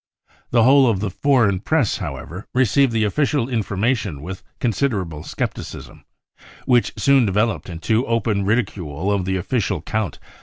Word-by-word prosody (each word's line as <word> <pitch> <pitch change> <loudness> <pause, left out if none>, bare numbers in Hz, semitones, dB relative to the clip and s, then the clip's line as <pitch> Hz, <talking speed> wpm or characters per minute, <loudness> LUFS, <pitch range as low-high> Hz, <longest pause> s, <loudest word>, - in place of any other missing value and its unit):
The 115 -1 +4
whole 135 +1 +6
of 105 -5 0
the 100 -1 -2
foreign 115 -5 +2
Press, 140 - +1
however, 85 - -7
received 130 +1 +3
the 110 -1 +1
official 140 +3 +1
information 110 - -1
with 95 +2 -7 0.2
considerable 105 - -1
scepticism, - - -6 0.6
which 120 -2 +2
soon 140 -2 +4
developed 105 0 0
into 110 +8 -1
open 115 -3 0
ridicule 95 - -1
of 100 -3 0
the 95 0 0
official 100 0 -1
account. 105 +6 -3
110 Hz, 140 wpm, -21 LUFS, 95-125 Hz, 0.6 s, whole